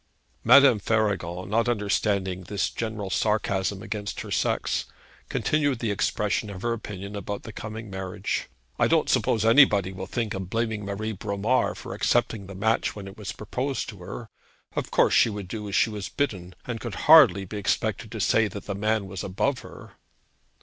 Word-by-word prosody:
Madame 130 -1 +7
Faragon, 95 -5 -1
not 115 +4 +1
understanding 100 -4 0
this 100 +2 -1
general 110 -4 -4
sarcasm 100 -2 0
against 105 -2 -4
her - - -8
sex, - - 0 0.4
continued 145 -4 +1
the 115 -2 -1
expression 105 +1 0
of 95 -2 -8
her 120 0 +1
opinion 100 -3 -7
about 100 0 -5
the 110 - -9
coming 110 +1 -7
marriage. 95 -2 -4 0.3
'I - - +4
don't - - +2
suppose 110 -1 +2
anybody 110 -6 +5
will 95 0 -6
think 115 -3 -2
of 95 -2 -5
blaming 110 -1 -1
Marie 105 +2 -3
Bromar 105 +4 0
for - - -7
accepting 100 -4 0
the 95 - -9
match 110 +4 +1
when 100 -2 -8
it 95 - -10
was 105 -3 -6
proposed 130 +6 -3
to 105 -4 -10
her. 110 +6 -7 0.5
Of - - -2
course, - - +3
she - - +5
would 105 -3 -6
do 105 +2 -5
as 100 - -3
she 115 - +3
was 105 -2 -5
bidden, 95 -11 -3
and 120 -2 -4
could 120 -5 -5
hardly 130 - +8
be 105 +3 -6
expected 100 - -1
to - - -5
say 115 -1 +3
that 100 -1 -8
the 100 - -3
man 105 +1 0
was 95 -1 -6
above 130 +8 0
her.' - - -12
105 Hz, 180 wpm, -26 LUFS, 95-115 Hz, 0.5 s, hardly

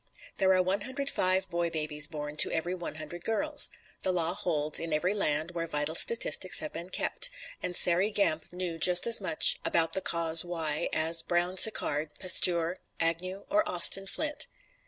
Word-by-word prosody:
There 190 -1 +1
are 185 - +1
one 190 +3 -3
hundred 275 +5 -4
five 185 +1 +1
boy 170 -1 -3
babies 150 -2 +1
born 150 -1 -8
to - - +5
every 170 +2 -4
one 175 -3 -8
hundred 160 +2 -10
girls. 290 +6 0 0.3
The 190 - -2
law 170 -1 -2
holds 155 -6 -2
in 165 -1 -6
every 175 +6 -1
land 155 -4 -2
where 170 -1 -6
vital 150 0 -2
statistics 470 - +1
have 305 - -1
been 175 +2 -8
kept; - - 0 0.3
and 180 - -5
Sairey 180 +4 +3
Gamp 200 -7 -2
knew 175 -2 -6
just 180 +1 +4
as 230 -3 +6
much 185 -5 +4
about 165 -1 0
the 190 - -2
cause 165 -1 +2
why 165 -2 -2
as 165 +1 +2
Brown 175 +1 -2
Sequard, 160 -7 +4
Pasteur, 180 -1 +3 0.2
Agnew 180 +4 -2
or 310 +1 +2
Austin 195 +2 +4
Flint. 300 +7 -4
175 Hz, 175 wpm, -27 LUFS, 160-190 Hz, 0.3 s, as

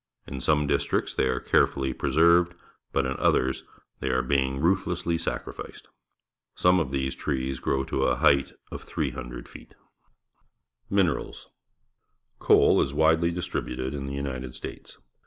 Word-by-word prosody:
In 65 -1 -6
some 75 +2 +2
districts 70 0 0
they 65 - +1
are 65 -1 0
carefully 65 -1 +1
preserved, 85 +6 +3 0.4
but 70 - +1
in 65 +1 -2
others 65 +1 +1 0.4
they - - -2
are 65 0 +1
being 65 0 +1
ruthlessly 85 0 +1
sacrificed. 85 - -6 0.7
Some 90 +1 +4
of 80 - -1
these 65 0 -1
trees 65 -2 -3
grow 65 0 0
to - - -1
a - - +2
height 70 -2 +3 0.2
of - - -6
300 - - -5
feet. - - -14 1.1
Minerals. 95 -6 0 0.5
— - - -50
Coal - - +5
is 70 - -2
wadely 80 +2 +4
distributed 70 -6 -3
in 70 -1 -4
the 70 0 -4
L'nited 65 -3 -5
States. - - -9
70 Hz, 140 wpm, -26 LUFS, 65-80 Hz, 1.1 s, Coal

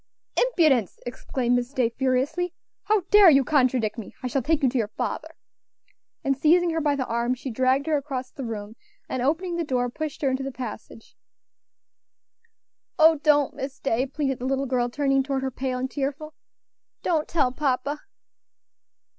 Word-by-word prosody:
"Impudence!" 310 - +2
exclaimed 245 0 -1
Miss 245 +2 -3
Day, 250 -4 +2
furiously; 265 +8 -1 0.3
"how 425 -1 +3
dare 415 -3 +9
you 275 -3 +5
contradict 250 -5 +1
me? 215 - -9
I - - -4
shall 265 +2 0
take 310 +3 0
you 265 - +5
to 260 - -2
your 220 - 0
father." 215 - -4 0.9
And 275 - +1
seizing 340 +5 +3
her 325 0 -1
by 290 -1 +1
the 265 -2 -2
arm, 235 +2 0
she 260 +1 -6
dragged 260 +4 +2
her 315 -2 +2
across 265 -3 -5
the 275 - -7
room, 220 -2 -6 0.3
and 255 - -3
opening 340 +6 0
the 340 - 0
door, 250 -4 -1
pushed 310 +2 -5
her 270 - +2
into 260 +1 -1
the 270 0 -4
passage. 230 -2 -9 1.8
"Oh! 320 -1 +6
don't, 290 -2 +3
Miss 270 0 -6
Day," 260 0 0
pleaded 270 -1 -2
the 250 - -5
little 270 +1 0
girl, 245 -2 0
turning 275 +1 +1
toward 270 0 -2
her, 265 - -2
pale 255 0 -3
and 260 +1 -3
tearful, 290 +2 -4 0.7
"don't 315 -3 +1
tell 285 -7 +1
papa." 280 +1 -1
270 Hz, 170 wpm, -25 LUFS, 250-300 Hz, 1.8 s, dare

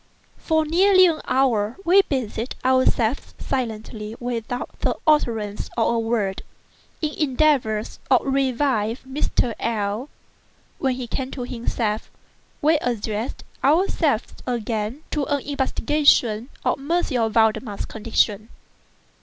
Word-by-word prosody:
For 315 -1 +1
nearly 370 +4 +5
an 330 -3 +1
hour, 240 -5 +1
we 370 +4 +7
busied 255 - -3
ourselves, 260 -1 +2
silently—without 230 0 -4
the - - 0
utterance 225 -9 +1
of 230 0 +2
a 230 - +1
word—in 225 +7 -4
endeavors 265 -7 +1
to 260 - +7
revive 260 -4 0
Mr. 265 -3 0
L—l. 220 +3 -2 0.7
When 265 -2 +1
he 255 -1 -5
came 255 +3 -3
to 260 -2 -5
himself, 230 -3 -2 0.5
we 315 +1 +5
addressed 225 -2 -3 0.2
ourselves 300 - +2
again 230 +2 -2
to 295 -3 0
an 285 0 0
investigation 265 -4 +2 0.2
of - - +1
M. 275 -7 0
Valdemar's 220 -1 +1
condition. 220 -1 0
245 Hz, 105 wpm, -23 LUFS, 220-285 Hz, 0.7 s, we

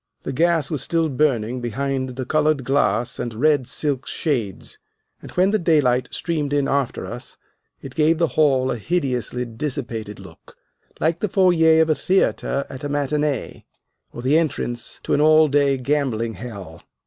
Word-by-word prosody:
The - - -4
gas 165 0 +1
was 150 -5 -2
still 165 +2 0
burning 125 -4 0
behind 130 +2 -3
the 130 0 -4
colored 155 0 +1
glass 120 -3 +1
and 120 -2 -4
red 140 0 +2
silk 140 -4 -1
shades, 115 - -3 0.4
and - - -10
when 185 +2 +3
the 215 - +2
daylight 135 -8 +2
streamed 150 -4 -2
in 140 -1 +1
after 140 -3 -1
us 120 +1 -7 0.5
it 135 - -8
gave 155 +2 +3
the 165 -1 +1
hall 135 -4 +2
a 120 - -2
hideously 125 - -2
dissipated 115 -4 -4
look, - - -15 0.4
like 160 +2 0
the 210 - -1
foyer 165 -4 +4
of 160 - 0
a - - +5
theatre 150 -5 0
at 130 - -9
a 145 - -3
matinee, 145 -1 -2 0.5
or 120 - -8
the 145 +5 +4
entrance 120 -7 -3
to - - -1
an 145 - +3
all 155 0 +6
day 140 -1 +2
gambling 125 -4 -1
hell. 100 -9 -9
140 Hz, 165 wpm, -22 LUFS, 125-155 Hz, 0.5 s, all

